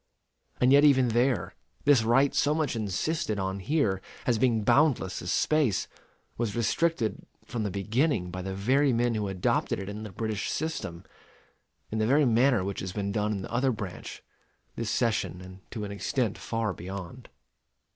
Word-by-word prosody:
And 125 +1 +4
yet 145 +1 +7
even 130 -4 +5
there, 120 -3 +1 0.3
this 140 -4 +6
right 135 +5 +3
so 150 +1 +2
much 155 -6 0
insisted 110 - -1
on 95 0 -2
here 100 - 0 0.2
as 120 -3 +2
being 115 -4 +2
boundless 125 - +2
as 90 - -3
space, 150 -9 +2 0.5
was 115 -4 -1
restricted 120 +1 0 0.2
from 115 0 -4
the 105 - -1
beginning 105 - 0
by 90 +1 -5
the 95 +1 -4
very 130 +7 +2
men 120 0 +1
who 105 -2 -1
adopted 95 -2 0
it 95 - -6
in 105 +1 -6
the 110 - -6
British 110 +1 -3
system, 95 - -4 0.9
in 110 - -1
the 110 - +2
very 145 +4 +4
manner 120 -2 +3
which 100 +1 -3
has 95 -1 -5
been 100 -1 -2
done 105 +1 0
in 100 -2 -2
the - - -8
other 130 +2 +2
branch, 105 -6 -7 0.5
this 115 -2 -3
session; 110 -6 0
and 95 +1 -11
to 110 -3 -5
an 100 - -5
extent 110 +2 -1
far 115 -3 -2
beyond. 95 +6 -8
110 Hz, 175 wpm, -28 LUFS, 100-130 Hz, 0.9 s, yet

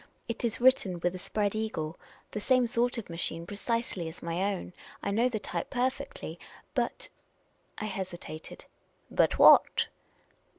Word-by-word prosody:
It 230 - -1
is 230 -2 0
written 235 -8 +4
with 175 +1 +1
a 185 - -6
Spread 205 +2 0
E:igle, 215 -8 -2 0.4
the 210 - -3
same 255 +3 +4
sort 240 +1 +1
of 230 - -5
machine 165 0 -3
precisely 205 -3 -2
as 160 - -13
my 175 +4 0
own. 180 - -8 0.3
I - - 0
know 230 +5 +3
the 235 - -2
type 215 - -3
perfectly. 260 - -2 0.3
But - - -1 0.3
" - - -40 0.3
I - - -3
hesitated. 185 -5 -6 0.3
" - - -36
But - - +3
what?" - - +7
210 Hz, 160 wpm, -30 LUFS, 175-240 Hz, 0.4 s, what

